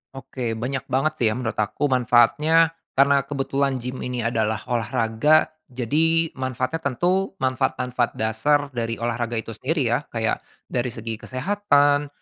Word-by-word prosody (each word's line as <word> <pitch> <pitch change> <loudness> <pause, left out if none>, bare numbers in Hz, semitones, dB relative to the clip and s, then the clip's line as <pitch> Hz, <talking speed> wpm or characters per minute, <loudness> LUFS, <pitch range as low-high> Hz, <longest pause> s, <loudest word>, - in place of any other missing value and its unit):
Oke, 130 -3 -4
banyak 130 +4 -4
banget 135 +4 +1
sih 115 - +3
ya 110 - +1
menurut 120 -3 -3
aku 120 +7 0
manfaatnya, 145 +7 +4 0.2
karena 140 0 +4
kebetulan 140 -1 -1
gim 125 +1 -5
ini 125 -2 -3
adalah 110 -2 0
olahraga, 115 +5 +2 0.2
jadi 160 +6 +1
manfaatnya 130 +4 -3
tentu 180 +8 0
manfaat-manfaat 125 -1 0
dasar 140 +7 +1
dari 115 -2 -2
olahraga 120 0 -2
itu 115 0 -4
sendiri 130 +2 -1
ya. 120 - +2
Kayak 115 -1 -1 0.3
dari 125 0 0
segi 115 -1 -5
kesehatan 145 -1 +2
130 Hz, 140 wpm, -23 LUFS, 115-145 Hz, 0.3 s, manfaatnya